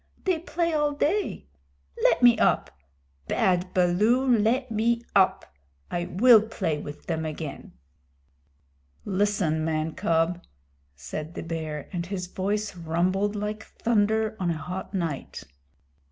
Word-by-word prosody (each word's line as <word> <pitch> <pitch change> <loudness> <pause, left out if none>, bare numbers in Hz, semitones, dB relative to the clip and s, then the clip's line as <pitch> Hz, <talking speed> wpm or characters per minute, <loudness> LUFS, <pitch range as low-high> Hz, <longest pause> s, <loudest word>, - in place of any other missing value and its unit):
They 365 -4 +1
play 335 0 -1
all 295 -1 +1
day. 335 - -1 0.6
Let - - +3
me 240 -1 +8
get - - -2
up! - - +2 0.6
Bad 180 0 +1
Baloo, 205 +9 +3
let 235 +4 +1
me 230 +2 +1
up! 190 -2 +3 0.5
I 175 0 -1
will 220 +5 +6
play 190 -8 -2
with 145 0 -9
them 160 -2 -2
again." 155 -2 -6 1.3
"Listen, 190 -5 0
man 155 0 -1
cub," 165 +2 0 0.5
said 155 - -7
the - - -5
Bear, 160 -3 -5
and 170 -1 -3
his 185 -2 -3
voice 200 +2 -2
rumbled 180 +5 0
like 210 +1 -3
thunder 220 -1 0
on 180 -2 0
a 165 - -1
hot 180 +5 -6
night. 165 - -3
185 Hz, 130 wpm, -26 LUFS, 165-220 Hz, 1.3 s, me